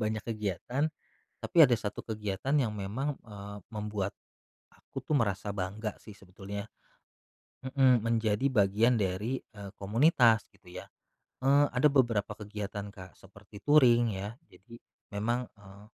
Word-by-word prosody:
banyak 110 0 -2
kegiatan, 115 - -2 0.6
tapi - - -7
ada 125 -6 +8
1 105 -2 -5
kegiatan 110 +5 -2
yang 125 -7 +1
memang, 110 +8 -3
eee, 100 -1 -8
membuat, 105 -2 -4 0.6
aku 135 - -10
tuh 135 - -8
merasa 105 -7 +1
bangga 100 +3 -4
sih 105 - -13
sebetulnya 100 +1 -8 1.0
mhm, 130 -2 +3
menjadi 115 +2 +1
bagian 110 +1 +3
dari, 105 +5 -1 0.2
eee, 100 -2 -8
komunitas 115 +2 +4
gitu 100 -3 -18
ya, - - -16 0.5
eee, 140 +2 +5
ada 130 +4 +5
beberapa 115 -7 +2
kegiatan, 105 -1 -6
Kak, 95 -1 -12
seperti 100 +1 -14
touring 120 -4 +4
ya 100 +5 -6
jadi 115 -1 -15 0.3
memang, 120 +4 -2
eee, 100 +1 -15
110 Hz, 130 wpm, -30 LUFS, 100-125 Hz, 1.0 s, ada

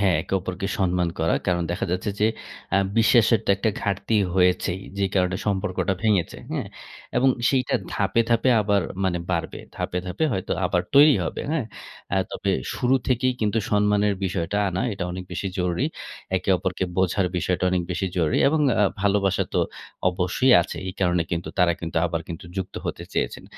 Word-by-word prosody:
হ্যাঁ, 95 -3 +3
একে 95 - -4
অপরকে 95 +2 -4
সম্মান 90 -2 +1
করা। 80 +1 +2
কারণ 90 -1 +1
দেখা 90 - -2
যাচ্ছে 95 +3 -1
যে, 105 - +5 0.4
অ্যা 100 - +3 0.2
বিশ্বাসের 115 -1 +5
তো - - -6
একটা 110 +3 +1
ঘাটতি 100 +2 -1 0.2
হয়েছেই। 90 0 +2 0.2
যে 100 - +2
কারণে 90 -1 +2
সম্পর্কটা 95 -1 0
ভেঙেছে। 100 -6 +1
হ্যাঁ? - - -2 0.5
এবং 130 +2 +4 0.2
সেইটা 130 -2 +1 0.2
ধাপে, 115 - +1
ধাপে 115 +2 +3
আবার 100 -1 +2 0.2
মানে 90 -2 +1
বাড়বে। 85 -2 -2 0.2
ধাপে, 90 - -2
ধাপে 125 - -1
হয়তো 95 -3 -2
আবার 90 0 +1
তৈরি 145 +1 +8
হবে। - - -4
হ্যাঁ? 155 -8 -1 0.4
অ্যা 95 - +2
তবে 100 - -2 0.2
শুরু 125 +1 +2
থেকেই 130 0 +2
কিন্তু 110 0 +1
সম্মানের 105 0 +2
বিষয়টা 90 +1 -2
আনা 95 +2 -2
এটা 95 -2 -4
অনেক 90 0 -6
বেশি 90 +3 -3
জরুরি। 90 +8 0 0.5
একে 95 +1 -1
অপরকে 95 +1 -2
বোঝার 95 +1 +2
বিষয়টা 90 +1 0
অনেক 90 -1 +1
বেশি 90 +2 -1
জরুরি 80 -3 +2
এবং 155 +1 +1
অ্যা 105 +1 +4 0.2
ভালোবাসা 100 -2 +2
তো - - +3 0.5
অবশ্যই 95 +8 +2
আছে। - - -7
এই 90 - -6
কারণে 90 -2 +2
কিন্তু 85 +1 -2
তারা 90 -2 +4
কিন্তু 85 -1 -5
আবার 85 -1 -2 0.4
যুক্ত 95 -1 -4
হতে - - -4
চেয়েছেন। - - -2
95 Hz, 175 wpm, -24 LUFS, 90-105 Hz, 0.5 s, তৈরি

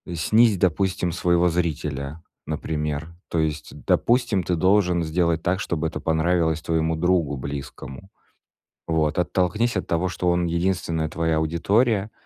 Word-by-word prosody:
снизь, 110 +6 +4
допустим, 90 0 0
своего 85 0 +2
зрителя, 75 -3 -3 0.2
например. 75 0 -3 0.2
То 85 - -1
есть, 75 -1 -3
допустим, 120 -5 +2
ты 90 +1 0
должен 90 -1 +2
сделать 85 0 0
так, 90 +2 0
чтобы 85 -3 -2
это - - -5
понравилось 80 0 +1
твоему 80 0 0
другу 85 -3 +1
близкому. 70 +5 -7 0.8
Вот. 80 -2 0
Оттолкнись 95 +6 0
от - - -3
того, 85 +2 0
что 90 0 -1
он- 85 0 +2
единственная 85 -2 -1
твоя 80 -1 0
аудитория, 100 +7 +1
85 Hz, 130 wpm, -23 LUFS, 80-90 Hz, 0.8 s, снизь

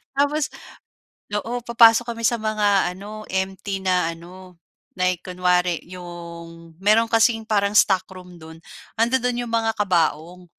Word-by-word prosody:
Tapos, 285 +2 +1 0.8
oo, 235 +4 -3
papasok 235 -1 +6
kami 230 - -9
sa 235 - 0
mga 205 -4 +1
ano, 210 +3 -9
empty 190 +1 -3
na 180 -3 +1
ano, 180 +2 -14 0.4
like 185 -1 0
kunwari 180 -1 0
'yong 170 -2 -10
meron 220 +3 +3
kasing 225 0 +3
parang 200 -1 +1
stock 190 -3 +4
room 180 -1 -13
do'n, 160 0 -13 0.4
'andodun 245 +1 +1
'yong 235 - -8
mga 225 -1 +1
kabaong. 175 -2 -1
190 Hz, 130 wpm, -22 LUFS, 180-225 Hz, 0.8 s, papasok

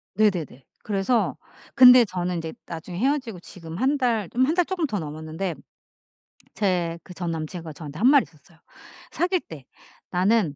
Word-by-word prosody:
네네네. 180 - 0 0.2
그래서 210 +3 0 0.4
근데 250 -1 +9
저는 180 -2 -3
이제 160 -1 -6
나중에 170 +1 -7
헤어지고 255 -4 -1
지금 165 -2 -10
1 270 +6 +2
달 230 -8 0
좀 255 +2 +2
1 310 - +2
달 355 -1 +3
쪼끔 350 -3 -1
더 210 -6 -2
넘었는데 160 +3 -5 1.0
제 180 -4 0
그 180 - -11
전 175 -1 -4
남자 155 -2 -4
친구가 165 -2 -8
저한테 150 +1 -9
한 235 - +4
말이 285 -2 +6
있었어요. 155 +1 -21 0.5
사귈 360 0 0
때 145 -5 -12 0.4
나는 185 -3 +2
185 Hz, 305 characters per minute, -24 LUFS, 165-245 Hz, 1.0 s, 근데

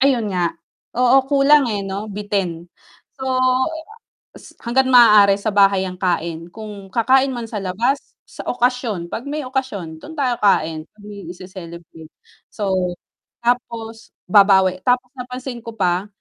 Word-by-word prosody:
Ayun 245 -7 +2
nga, 175 -2 0 0.4
oo, 250 +1 +5
kulang 280 -1 +4
eh 205 -2 -2
'no, 195 +2 -5
bitin. 195 -5 -3 0.5
So 265 - -5 1.1
s - - -14
hangga't 260 +2 +2
maaari 210 -6 +7
sa 215 +1 -1
bahay 195 -1 +4
ang 180 0 -8
kain, 170 -2 -2
kung 210 -3 -9
kakain 260 +4 +3
man 235 -1 -5
sa 215 -2 -5
labas, 220 +9 -2
sa - - -10
okasyon 240 -8 -1
'pag 235 - -4
may 300 0 -3
okasyon 205 -12 -4
dun 320 - -11
tayo 255 -5 0
kain, 160 -5 +1
'pag 210 - -21
may 205 -3 -9
ise-celebrate. 170 -3 -11 0.4
So, 185 -4 -1 0.5
tapos 230 -2 -2 0.2
babawi, 190 -2 +5
tapos 250 0 +2
napansin 250 0 -6
ko 230 -1 -9
pa 185 0 0
210 Hz, 140 wpm, -20 LUFS, 185-245 Hz, 1.1 s, maaari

